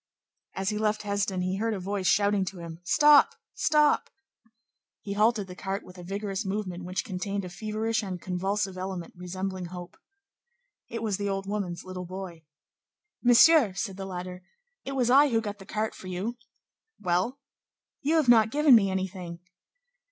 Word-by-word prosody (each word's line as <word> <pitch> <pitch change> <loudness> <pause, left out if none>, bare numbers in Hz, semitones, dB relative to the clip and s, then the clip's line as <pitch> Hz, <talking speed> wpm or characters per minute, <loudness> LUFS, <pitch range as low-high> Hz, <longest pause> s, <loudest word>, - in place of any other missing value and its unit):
As 195 0 -1
he 210 - -2
left 215 0 0
Hesdin, 200 -2 -1
he 185 +1 -1
heard 225 +1 0
a - - -4
voice 190 0 -2
shouting 200 0 +3
to 190 0 -6
him: 165 -1 -8
"Stop! 295 - +6 0.2
Stop!" 300 -1 +3 0.9
He 200 - -5
halted 215 0 +2
the 180 - -9
cart 195 +2 -4
with 180 0 -13
a - - -8
vigorous 195 +2 -3
movement 190 -3 -4
which 185 +5 -3
contained 200 -1 -3
a - - -6
feverish 215 +4 -2
and 190 -3 -5
convulsive 190 +1 -2
element 185 +3 -5
resembling 185 +1 -4
hope. 175 0 -9 0.9
It 230 0 -5
was 210 -4 0
the 200 0 -2
old 195 0 -2
woman's 195 -4 -3
little 185 -1 -6
boy. 180 -3 -8 0.8
"Monsieur," 245 - +6
said 195 0 -3
the 195 -1 -5
latter, 180 0 -6 0.4
"it 275 - -5
was 250 -2 +1
I 285 +2 +7
who 230 -3 +2
got 205 -2 -5
the 195 - -12
cart 215 0 -2
for 185 - -11
you." 190 +6 -3 0.6
"Well?" 180 +9 0 0.6
"You 300 +3 +1
have 310 -5 +3
not 225 -2 +6
given 295 +1 +5
me 205 -4 +6
anything." 185 -2 -4
195 Hz, 170 wpm, -28 LUFS, 185-220 Hz, 0.9 s, I